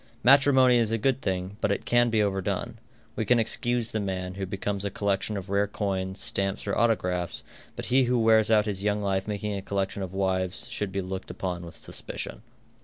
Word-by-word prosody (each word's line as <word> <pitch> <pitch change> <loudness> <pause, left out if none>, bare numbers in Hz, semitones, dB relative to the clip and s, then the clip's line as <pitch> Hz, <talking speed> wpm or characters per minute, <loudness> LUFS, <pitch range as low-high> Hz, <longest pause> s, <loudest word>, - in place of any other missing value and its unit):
Matrimony 130 -2 +6
is 115 -2 +2
a 115 - +1
good 130 +3 +1
thing, 95 +1 -3
but - - +1
it - - -2
can 120 0 +4
be 110 -2 +2
overdone. 100 -1 -2 0.4
We - - -1
can 120 +3 +3
excuse 120 +1 0
the 110 - -1
man 95 -2 -3
who 95 0 -4
becomes 100 +1 -3
a 100 - -1
collection 100 +1 -1
of 95 0 -7
rare 100 +1 +2
coins, 95 -2 -3
stamps, 95 0 -1
or 100 - -1
autographs, 90 -7 +1 0.3
but - - -5
he 130 0 +5
who 125 +1 +1
wears 110 -1 +4
out 105 -2 +4
his 100 -2 -3
young 105 0 0
life 95 0 0
making 105 0 -2
a 100 - -3
collection 100 0 -2
of 95 -2 -4
wives, 95 -1 -1
should 105 -2 -3
be 100 +1 -2
looked 95 +1 -6
upon 90 -2 -4
with 85 - -11
suspicion. - - -5
100 Hz, 205 wpm, -27 LUFS, 95-110 Hz, 0.4 s, Matrimony